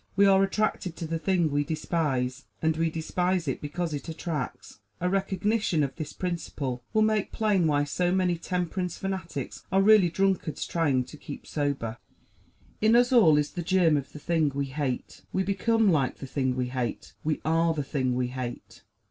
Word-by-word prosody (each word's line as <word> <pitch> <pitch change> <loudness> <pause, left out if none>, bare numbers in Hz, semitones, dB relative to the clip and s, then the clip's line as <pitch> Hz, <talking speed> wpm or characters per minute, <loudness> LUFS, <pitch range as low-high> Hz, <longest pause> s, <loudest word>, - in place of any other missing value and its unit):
We 200 +1 +5
are 195 -1 +6
attracted 195 -3 0
to 170 - -5
the 165 +1 -2
thing 175 -3 +1
we 145 +1 +1
despise; 140 -5 -1
and 160 0 +1
we 165 +1 +1
despise 175 +2 -1
it 135 - -2
because 160 +2 -3
it 145 +3 -5
attracts. 160 -9 -5 0.2
A 180 - 0
recognition 195 -2 +1
of 135 - -3
this 155 -2 -5
principle 145 -8 -4
will 215 - +3
make 215 -2 +1
plain 205 -6 +2
why 145 -1 +2
so 175 +5 0
many 185 -2 +2
temperance 180 +1 -2
fanatics 185 -8 -4
are 195 - +4
really 200 -2 +6
drunkards 190 -3 0
trying 145 -6 +1
hard 125 - -7
to 150 - -10
keep 145 - -9
sober. 140 -6 -2 0.8
In 220 +2 +5
us 245 +1 +4
all 165 -11 +7
is 150 0 0
the 175 - -4
germ 175 -2 +3
of 140 -2 -3
the - - -9
thing 160 0 +1
we 140 0 0
hate; 135 -2 -4
we 190 - +1
become 215 +2 +2
like 140 -6 +1
the - - -7
thing 130 -1 -1
we 125 -1 -1
hate; 125 -2 -4
we 155 0 0
are 165 +1 +2
the 145 - -1
thing 130 -3 -1
we 125 0 0
hate. 125 -1 -6
165 Hz, 190 wpm, -27 LUFS, 145-190 Hz, 0.8 s, all